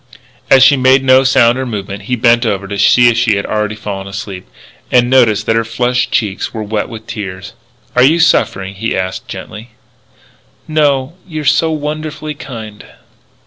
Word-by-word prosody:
As 130 Hz, -1 st, +6 dB
she 140 Hz, +1 st, +6 dB
made 130 Hz, +1 st, +3 dB
no 130 Hz, 0 st, +5 dB
sound 130 Hz, -2 st, +3 dB
or 130 Hz, -, -2 dB
movement 100 Hz, -3 st, -6 dB
he 125 Hz, -, +1 dB
bent 120 Hz, 0 st, +3 dB
over 100 Hz, -4 st, -2 dB
to 100 Hz, 0 st, -5 dB
see 120 Hz, +4 st, +5 dB
if 115 Hz, -, 0 dB
she 110 Hz, -3 st, +2 dB
had 100 Hz, -, -2 dB
already 105 Hz, 0 st, -2 dB
fallen 100 Hz, -2 st, -6 dB
asleep. 100 Hz, -, -7 dB, 0.4 s
And 125 Hz, 0 st, +3 dB
noticed 115 Hz, -5 st, +3 dB
that 115 Hz, -, +1 dB
her 115 Hz, -, +1 dB
flushed 125 Hz, +3 st, -1 dB
cheeks 105 Hz, +1 st, -2 dB
were 110 Hz, -, -3 dB
wet 105 Hz, +2 st, -3 dB
with 110 Hz, -2 st, -9 dB
tears. 100 Hz, -3 st, -7 dB, 0.4 s
"Are 125 Hz, -, +4 dB
you 155 Hz, +6 st, +4 dB
suffering?" 100 Hz, -, +1 dB
he 110 Hz, +4 st, -3 dB
asked 95 Hz, +7 st, -4 dB
gently. 110 Hz, +2 st, -9 dB, 0.9 s
"No.... 145 Hz, -2 st, +1 dB
You 155 Hz, -3 st, -5 dB
are -, -, -8 dB
so 160 Hz, +4 st, +2 dB
wonderfully 155 Hz, 0 st, -4 dB
kind...." 110 Hz, -7 st, -9 dB
115 Hz, 180 wpm, -14 LUFS, 105-130 Hz, 0.9 s, As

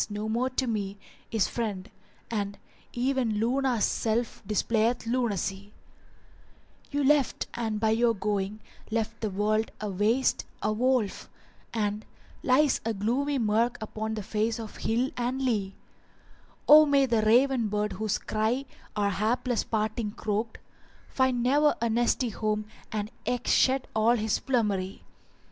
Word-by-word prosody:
no 210 Hz, +1 st, -4 dB
more 235 Hz, +4 st, 0 dB
to 260 Hz, +1 st, -1 dB
me 205 Hz, -4 st, -2 dB, 0.2 s
* -, -, -31 dB
Is 190 Hz, -, +4 dB
friend; 210 Hz, -5 st, -3 dB, 0.4 s
and 200 Hz, -2 st, -2 dB, 0.3 s
even 250 Hz, -3 st, 0 dB
Luna's 245 Hz, 0 st, +1 dB
self 230 Hz, +1 st, -1 dB
displayeth 225 Hz, +3 st, +1 dB
lunacy: 205 Hz, -4 st, -2 dB, 1.1 s
You 285 Hz, 0 st, -1 dB
left 285 Hz, -1 st, +2 dB
and 220 Hz, -3 st, -2 dB
by 220 Hz, 0 st, +2 dB
your 230 Hz, +1 st, +3 dB
going 205 Hz, +1 st, -2 dB, 0.3 s
left 225 Hz, 0 st, -2 dB
the 215 Hz, -, -1 dB
world 215 Hz, +3 st, 0 dB
a 210 Hz, -1 st, -3 dB
waste, 220 Hz, +7 st, +1 dB, 0.2 s
a 215 Hz, -, +1 dB
wold, 245 Hz, -2 st, +2 dB, 0.4 s
* -, -, -32 dB
And 210 Hz, -1 st, -1 dB, 0.4 s
lies 275 Hz, +2 st, +3 dB
a 225 Hz, -1 st, -1 dB
gloomy 260 Hz, +8 st, 0 dB
murk 230 Hz, +1 st, +1 dB
upon 220 Hz, 0 st, -4 dB
the 210 Hz, -, -4 dB
face 220 Hz, +2 st, -1 dB
of 220 Hz, -2 st, -8 dB
hill 240 Hz, +4 st, 0 dB
and 250 Hz, +2 st, -1 dB
lea: 215 Hz, -7 st, -1 dB, 0.9 s
O 305 Hz, +1 st, +9 dB
may 280 Hz, -1 st, +4 dB
the 230 Hz, -4 st, +2 dB
raven 240 Hz, +2 st, +4 dB
bird 210 Hz, 0 st, -1 dB
whose 215 Hz, +1 st, -1 dB
cry 220 Hz, +5 st, -1 dB, 0.3 s
our 205 Hz, -1 st, +1 dB
hapless 230 Hz, +4 st, 0 dB
parting 215 Hz, 0 st, -1 dB
croaked 220 Hz, +1 st, -2 dB, 0.3 s
* -, -, -29 dB
Find 260 Hz, -2 st, +1 dB
ne'er 290 Hz, +4 st, +4 dB
a 235 Hz, -1 st, 0 dB
nesty 240 Hz, +2 st, +1 dB
home 215 Hz, 0 st, -2 dB, 0.3 s
and 210 Hz, 0 st, -3 dB, 0.2 s
eke 245 Hz, -1 st, -1 dB
shed 265 Hz, 0 st, +3 dB
all 220 Hz, +2 st, +4 dB
his 220 Hz, -2 st, 0 dB
plumery! 205 Hz, -7 st, -1 dB
225 Hz, 145 wpm, -28 LUFS, 210-250 Hz, 1.1 s, O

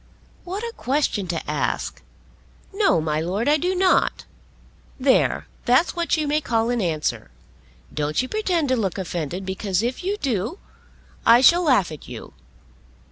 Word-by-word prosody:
"What 385 Hz, +5 st, -5 dB
a 465 Hz, 0 st, -4 dB
question 255 Hz, -7 st, 0 dB
to 170 Hz, -1 st, -4 dB
ask! -, -, -2 dB, 0.7 s
No; 395 Hz, -, +3 dB
my 155 Hz, -1 st, -1 dB
Lord, 190 Hz, -, -2 dB
I 300 Hz, +1 st, +4 dB
do 360 Hz, +5 st, -1 dB
not. 370 Hz, 0 st, +2 dB, 0.7 s
There; 260 Hz, 0 st, +2 dB, 0.2 s
that's 255 Hz, +10 st, +3 dB
what 340 Hz, -1 st, 0 dB
you 305 Hz, -1 st, -1 dB
may 300 Hz, +1 st, +1 dB
call 230 Hz, -3 st, 0 dB
an 240 Hz, -2 st, 0 dB
answer. 155 Hz, -, -2 dB, 0.6 s
Don't 150 Hz, 0 st, -1 dB
you 255 Hz, -, 0 dB
pretend 355 Hz, -6 st, 0 dB
to 260 Hz, -, +3 dB
look 200 Hz, -7 st, -2 dB
offended, 175 Hz, 0 st, -4 dB
because 190 Hz, +1 st, -1 dB
if 250 Hz, +8 st, -3 dB
you 400 Hz, +3 st, -1 dB
do, 240 Hz, -, -2 dB, 0.7 s
I 235 Hz, +2 st, +6 dB
shall 340 Hz, +7 st, +6 dB
laugh 255 Hz, -, +3 dB
at 155 Hz, -, -10 dB
you. -, -, -9 dB
245 Hz, 155 wpm, -23 LUFS, -, 0.7 s, I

